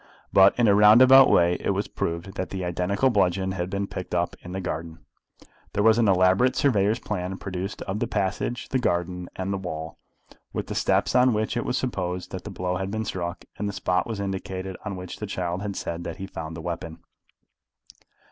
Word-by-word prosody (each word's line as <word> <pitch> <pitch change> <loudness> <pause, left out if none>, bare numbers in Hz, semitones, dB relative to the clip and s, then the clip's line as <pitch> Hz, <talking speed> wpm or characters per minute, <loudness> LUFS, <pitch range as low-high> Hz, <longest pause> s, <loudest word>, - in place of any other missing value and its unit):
But 95 0 +6
in 120 -2 +4
a 100 - +6
roundabout 125 +6 +8
way 85 +1 +4
it - - -1
was - - -1
proved 85 +3 -4
that 95 - -4
the 95 -2 -4
identical 90 +8 +1
bludgeon 95 -2 +1
had 90 -1 -3
been 100 +1 -2
picked - - -5
up - - 0
in 90 - -9
the 95 - -3
garden. 80 -2 -5 0.7
There 105 - +1
was 110 +1 +5
an 115 - +3
elaborate 95 +6 +4
surveyor's 110 -5 +2
plan 95 -5 -4
produced 95 +1 -5
of 100 +2 -3
the 120 - -1
passage, 105 +4 -2
the 130 - +1
garden, 90 -4 -1
and 95 +1 -2
the 100 - -2
wall, 80 -4 -6 0.5
with - - -2
the - - -5
steps - - +1
on 125 -2 +4
which 110 +2 -1
it 120 - -1
was 125 - 0
supposed 90 -7 -3
that 95 - -6
the - - -5
blow 90 -1 -2
had 95 +1 -3
been 110 +2 -3
struck; 85 -1 -4
and 105 0 -1
the - - -5
spot 90 -2 0
was 110 -3 -4
indicated 95 -1 -4
on 100 -3 -4
which 90 -1 -7
the 105 - -4
child 90 -1 -3
had 100 -1 -4
said 85 -1 -4
that 85 - -6
he - - -7
had 95 - -8
found 80 0 -6
the - - -6
weapon. 85 -1 -6
95 Hz, 215 wpm, -25 LUFS, 90-105 Hz, 0.7 s, roundabout